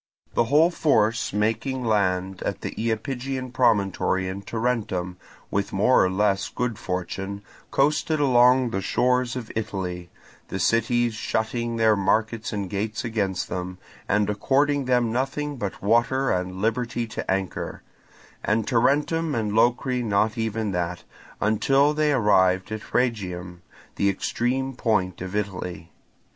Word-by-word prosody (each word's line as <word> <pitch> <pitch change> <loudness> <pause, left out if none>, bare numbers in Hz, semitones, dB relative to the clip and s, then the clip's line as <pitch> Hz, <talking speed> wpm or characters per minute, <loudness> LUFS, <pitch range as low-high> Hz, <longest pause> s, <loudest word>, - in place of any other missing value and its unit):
The 120 - +2
whole 155 +7 +4
force 115 -9 +2
making 115 +5 -1
land 95 -3 0
at - - -3
the - - -4
Iapygian 125 +3 -3
promontory 100 -6 +2
and 95 +2 -5
Tarentum, 105 -7 -2 0.3
with 100 0 -1
more 105 +7 +4
or 95 - +2
less 95 0 +1
good 125 -3 -3
fortune, 95 +2 -4 0.3
coasted 150 +2 +1
along 125 -2 +4
the 95 - -1
shores 125 +4 +1
of 120 -4 -6
Italy, 95 -5 -4 0.4
the - - -4
cities 120 +1 +2
shutting 115 +2 -2
their 110 -1 +4
markets 110 +3 0
and 100 -3 -3
gates 105 +4 -3
against 100 -5 -1
them, 90 +1 -5 0.3
and 105 0 +2
according 140 +7 +1
them 125 -2 +2
nothing 135 +4 -2
but 100 -5 -5
water 120 +5 +2
and 90 0 -2
liberty 120 +1 0
to 110 - -6
anchor, 95 -1 -2 0.6
and 110 +1 +1
Tarentum 145 +5 +1
and 110 -3 -1
Locri 125 +3 +2
not 105 0 +1
even 110 -2 -2
that, 90 0 -3 0.4
until 135 +8 +3
they 150 0 +2
arrived 95 -6 +3
at 110 -1 -6
Rhegium, 90 -8 -2 0.4
the 100 - +3
extreme 130 +6 -1
point 105 -8 0
of 95 +2 -5
Italy. 90 -4 -4
110 Hz, 135 wpm, -24 LUFS, 95-125 Hz, 0.6 s, whole